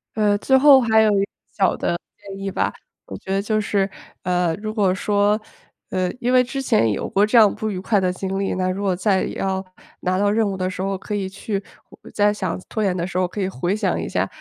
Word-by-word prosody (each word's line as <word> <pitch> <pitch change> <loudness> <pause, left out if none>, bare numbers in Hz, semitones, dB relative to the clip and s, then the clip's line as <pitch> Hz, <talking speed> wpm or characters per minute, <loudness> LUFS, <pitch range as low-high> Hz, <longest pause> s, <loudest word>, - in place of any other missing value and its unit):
呃， 210 -1 +2
最 265 +5 +2
后 275 -1 +8
还 220 -2 +4
有 215 -1 +4
一 200 - +2
个 - - 0 0.3
小 190 -2 +3
的 170 - -1 0.2
建 200 -1 -10
议 195 0 -3
吧， - - 0 0.4
我 - - -7
觉 190 - -8
得 195 0 +1
就 215 +1 0
是， 200 -2 0 0.3
呃， 180 -2 +1
如 215 0 -3
果 200 -4 +2
说， 205 +1 +1 0.5
呃， 185 -1 -1
因 245 0 0
为 255 0 +5
之 270 +2 -4
前 215 - +2
有 - - -3
过 200 +1 +3
这 215 +3 -2
样 215 -3 +7
不 215 -1 -3
愉 185 - -4
快 200 +1 +1
的 185 -1 0
经 190 +1 -3
历。 195 - -1
那 185 0 -1
如 195 +2 -3
果 190 -2 +1
再 190 0 +1
要 190 0 -2 0.4
拿 185 +1 0
到 205 0 +3
任 215 0 +2
务 195 - -2
的 185 0 -1
时 185 - -5
候 195 0 -1
可 210 - -7
以 195 -2 -2
去 195 +1 -4 0.5
再 205 0 +3
想 185 -4 -3
拖 220 - -2
延 185 -2 +1
的 170 - -1
时 190 - -10
候， 185 - +2
可 185 - -7
以 190 - 0
回 175 +3 -2
想 215 - 0
一 - - -4
下， - - 0
195 Hz, 265 characters per minute, -21 LUFS, 185-215 Hz, 0.5 s, 后